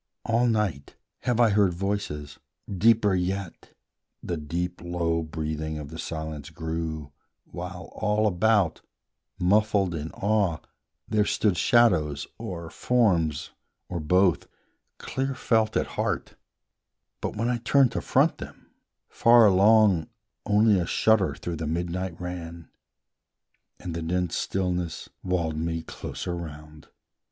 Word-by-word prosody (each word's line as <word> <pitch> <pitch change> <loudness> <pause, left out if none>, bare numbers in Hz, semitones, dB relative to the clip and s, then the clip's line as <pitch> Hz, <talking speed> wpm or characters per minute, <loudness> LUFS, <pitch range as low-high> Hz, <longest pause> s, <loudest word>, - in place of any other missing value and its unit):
All 115 +2 +2
night 105 - -1 0.2
have 120 -2 -1
I 115 -3 +5
heard 100 -4 +3
voices: 90 -7 -3 0.3
deeper 105 +1 +3
yet 95 0 -3 0.5
The 85 - -2
deep 85 +3 -4
low 85 -1 -1
breathing 80 0 -4
of 75 -2 -7
the 80 +2 -9
silence 80 -3 -5
grew, 80 -3 -4 0.3
While 90 +1 -8
all 105 0 +1
about, 100 -3 +2 0.6
muffled 100 0 +2
in 80 -1 -4
awe, 100 -5 +1 0.5
there 105 -1 +2
stood 105 -2 +1
Shadows, 80 - +3
or 85 -2 -6
forms, 90 - +1 0.4
or 90 - -3
both, 90 +2 +2 0.5
clear 135 0 -3
felt 110 -3 +1
at - - +1
heart, - - -3 0.9
But, - - -3
when 115 +3 -1
I 125 0 +1
turned 130 +2 +3
to - - -2
front - - +2
them, - - -11 0.4
far 120 -1 +6
along 100 -3 +5 0.4
Only 105 -1 +4
a 85 - -2
shudder 110 -4 +2
through 85 -2 -5
the 80 0 -4
midnight 85 +2 -3
ran, 85 -2 -7 1.1
And 85 - -6
the 85 - -4
dense 90 +1 -1
stillness 90 -3 -2
walled 85 -4 -1
me 80 +1 -2
closer 90 +2 -5
round. 75 -2 -9
90 Hz, 125 wpm, -26 LUFS, 80-105 Hz, 1.1 s, far